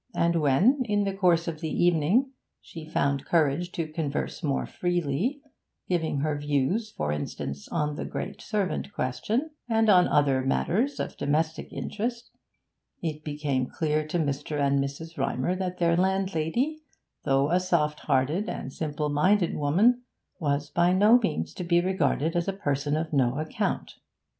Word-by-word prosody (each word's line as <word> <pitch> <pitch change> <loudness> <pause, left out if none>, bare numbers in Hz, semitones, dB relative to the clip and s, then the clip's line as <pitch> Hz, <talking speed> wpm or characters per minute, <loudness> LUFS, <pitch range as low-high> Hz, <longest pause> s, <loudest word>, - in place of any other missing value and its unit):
And 170 0 +2
when, 185 - +4
in 205 -2 +1
the 195 -1 -1
course 175 -3 +2
of 160 -2 -4
the 160 - -2
evening, 175 - +2 0.3
she 155 -2 -10
found 140 -3 0
courage 165 +2 +1
to 165 - -2
converse 155 -2 -3
more 140 -5 0
freely, 175 - -1 0.4
giving 160 -5 0
her 155 0 0
views, 145 - 0
for 75 - -3
instance, 70 -1 -4
on 150 -3 -1
the - - -3
great - - -5
servant 205 -2 -2
question, 225 - -1 0.2
and 225 -1 +3
on 180 -2 +6
other 140 -3 +3
matters 230 - 0
of - - -4
domestic 160 +2 -1
interest, 235 +3 -4 0.7
it 155 -2 -3
became 145 -4 -1
clear 155 -1 0
to 160 - -1
Mr. 145 -1 -2
and 140 0 +2
Mrs. 140 +4 -5
Rymer 135 +5 0
that 180 -1 -3
their 170 -1 +3
landlady, 190 - 0 0.4
though 135 +1 +2
a 180 - +4
soft 160 -5 0
hearted 150 +11 0
and 135 - -5
simple 150 -1 -2
minded 175 +5 +2
woman, 200 +13 +3 0.4
was 145 -2 -1
by 175 +1 +3
no 210 +6 +6
means 215 - -2
to 180 - -5
be 170 0 +3
regarded 165 -3 0
as 170 -1 0
a 195 - 0
person 145 -5 -1
of 160 0 -3
no 130 -2 +2
account. 155 +1 -2
160 Hz, 155 wpm, -27 LUFS, 145-190 Hz, 0.7 s, on